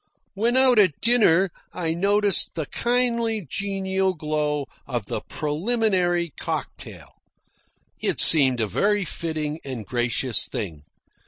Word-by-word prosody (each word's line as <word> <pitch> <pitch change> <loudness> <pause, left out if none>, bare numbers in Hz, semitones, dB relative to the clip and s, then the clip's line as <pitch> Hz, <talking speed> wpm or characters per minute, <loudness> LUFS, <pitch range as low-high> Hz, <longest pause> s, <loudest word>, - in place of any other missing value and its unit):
When 230 +5 0
out 260 -3 +5
at 185 -8 +2
dinner 195 -6 +3 0.2
I 165 -2 -2
noticed 200 +3 +2
the 160 -3 -3
kindly, 235 - 0
genial 190 +2 -2
glow 150 -2 -2 0.2
of 120 -5 -4
the - - -4
preliminary 175 - -1
cocktail. - - -6 0.9
It - - -1
seemed 135 -6 +6
a - - +1
very 200 - 0
fitting 155 -2 -4
and 130 -6 -7
gracious 120 +1 0
thing. 85 -9 -6
175 Hz, 115 wpm, -23 LUFS, 150-205 Hz, 0.9 s, seemed